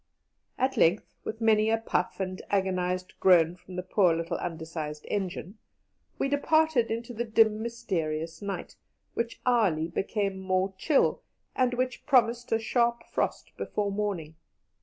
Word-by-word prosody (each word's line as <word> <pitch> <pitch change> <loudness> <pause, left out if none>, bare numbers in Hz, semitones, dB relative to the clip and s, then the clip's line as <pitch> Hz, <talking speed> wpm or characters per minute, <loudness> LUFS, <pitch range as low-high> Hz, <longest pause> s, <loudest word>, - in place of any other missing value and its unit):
At 265 +1 0
length, 175 +6 +3
with 225 - -5
many 220 -1 +4
a 225 - +3
puff 225 -5 -1
and 185 -1 -3
agonized 185 -2 0
groan 175 -2 +5
from 180 0 -12
the 180 - -3
poor 185 -2 +3
little 165 +1 -2
undersized 160 -3 -5
engine, 195 +1 -3 0.6
we - - 0
departed 285 -3 +2
into 230 +2 -4
the 235 +1 -2
dim, 220 -1 +3
mysterious 165 -8 -3
night, 200 -1 -5 0.4
which 235 0 -3
hourly 200 -11 +3
became 195 +1 -2
more 190 0 0
chill, 280 +9 +2 0.3
and 250 -1 +2
which 255 +2 -2
promised 240 -3 +3
a 225 - +4
sharp 235 +1 +1
frost - - -2
before 205 -1 -2
morning. 195 -6 -2
200 Hz, 140 wpm, -28 LUFS, 180-235 Hz, 0.6 s, groan